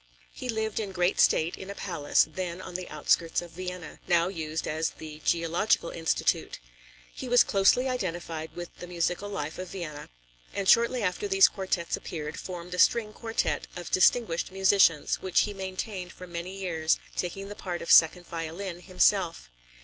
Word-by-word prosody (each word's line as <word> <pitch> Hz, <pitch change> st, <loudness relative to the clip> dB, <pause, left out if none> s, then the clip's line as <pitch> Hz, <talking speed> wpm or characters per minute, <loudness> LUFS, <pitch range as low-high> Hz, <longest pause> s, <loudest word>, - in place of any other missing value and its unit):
He 250 Hz, -, -7 dB
lived 220 Hz, -2 st, -1 dB
in 200 Hz, -3 st, -4 dB
great 180 Hz, 0 st, +1 dB
state 160 Hz, +2 st, +3 dB
in 190 Hz, -, -8 dB
a 200 Hz, -, -6 dB
palace, 155 Hz, -8 st, +1 dB
then 175 Hz, +2 st, -5 dB
on 185 Hz, -, -8 dB
the 180 Hz, 0 st, -5 dB
outskirts 155 Hz, +2 st, +1 dB
of 175 Hz, -1 st, -8 dB
Vienna, 180 Hz, -2 st, -7 dB
now 170 Hz, 0 st, +3 dB
used 160 Hz, -3 st, -4 dB
as 160 Hz, +1 st, 0 dB
the 155 Hz, -1 st, -10 dB
Geological 170 Hz, +2 st, +1 dB
Institute. 165 Hz, -1 st, 0 dB, 0.6 s
He 255 Hz, -, -6 dB
was 245 Hz, 0 st, +7 dB
closely 200 Hz, +6 st, +3 dB
identified 175 Hz, -9 st, -4 dB
with 175 Hz, 0 st, -7 dB
the 175 Hz, -, -8 dB
musical 180 Hz, +3 st, -1 dB
life 160 Hz, -6 st, -4 dB
of 185 Hz, -, -5 dB
Vienna, 155 Hz, -6 st, -7 dB, 0.5 s
and 195 Hz, -1 st, -2 dB
shortly 235 Hz, +2 st, +4 dB
after 180 Hz, +2 st, -1 dB
these 195 Hz, 0 st, +6 dB
quartets 185 Hz, -3 st, -2 dB
appeared, 150 Hz, -2 st, -6 dB
formed 180 Hz, -1 st, -7 dB
a 180 Hz, -, -3 dB
string 220 Hz, -3 st, +4 dB
quartet 225 Hz, 0 st, -2 dB
of 175 Hz, -1 st, -7 dB
distinguished 185 Hz, -3 st, +3 dB
musicians, 190 Hz, -5 st, +3 dB
which 185 Hz, -2 st, +3 dB
he 210 Hz, -, -2 dB
maintained 190 Hz, -1 st, -5 dB
for 180 Hz, -, -10 dB
many 175 Hz, +2 st, -6 dB
years, 165 Hz, -4 st, +1 dB, 0.2 s
taking 195 Hz, +2 st, -3 dB
the 205 Hz, -, -7 dB
part 180 Hz, -4 st, -5 dB
of -, -, -1 dB
second 175 Hz, +2 st, +6 dB
violin 170 Hz, +3 st, -5 dB
himself. 180 Hz, -, +1 dB
180 Hz, 170 wpm, -28 LUFS, 165-195 Hz, 0.6 s, was